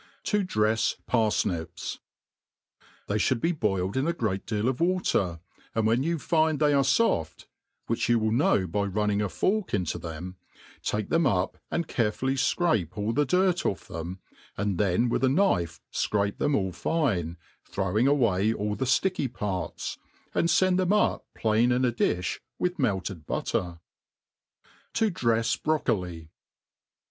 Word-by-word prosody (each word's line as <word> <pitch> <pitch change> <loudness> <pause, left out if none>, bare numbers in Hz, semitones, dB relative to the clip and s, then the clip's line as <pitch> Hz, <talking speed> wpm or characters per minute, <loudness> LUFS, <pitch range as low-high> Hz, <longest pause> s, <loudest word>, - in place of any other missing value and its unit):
;.7i 205 -3 +1
dre/s 110 -6 +1
Par/nips* 105 -7 -1 1.1
THEY 105 +1 0
(hould 120 +4 +2
be 165 - +1
boiled 100 - -1
in 135 +4 +1
a 170 - +1
great 105 - -2
deal 110 0 0
of 130 +2 -1
water, 110 - +1 0.3
and 110 -1 +1
when 115 +3 +3
you 165 +4 0
find 160 0 +2
they 150 -1 +3
are 140 - +4
foft 135 - +1 0.4
(which 115 0 -1
you 120 - +5
will 110 -1 +1
know 110 -5 +3
by 95 +4 -1
running 105 +1 0
a 105 - -1
fork 185 - 0
into 90 -5 -2
them), 90 +3 -7 0.4
take 105 -1 -2
them 165 -3 +3
up, 90 -6 0
and 170 -2 -1
carefully 125 +4 0
(crape 135 - +1
all 105 +2 -1
the 145 +1 +1
dirt 180 +1 +2
off - - -2
them, 85 +3 -6 0.4
and 100 -3 -1
then 100 +4 +2
with 120 - 0
a 130 - +5
knife 95 - +1
fcrape 100 -1 0
them 145 -1 +2
all 95 -5 0
fine, 90 - -1 0.3
throwing 100 +6 0
away 110 -8 +3
all 105 -1 -2
the 130 - -2
fticky 145 +3 +1
parts^ 100 -6 -4 0.3
and 170 - +2
fend 185 +1 +3
them 185 +2 +2
up 210 - +1
plain 115 +2 +2
in 125 +1 +2
a 125 - +2
difli 90 -6 -1 0.2
with 180 0 -1
melted 95 - -1
butter. 90 -2 -2 1.2
To 220 -2 +2
drejs 115 -7 +1
Broccoli. 90 - -1
110 Hz, 155 wpm, -27 LUFS, 95-145 Hz, 1.2 s, you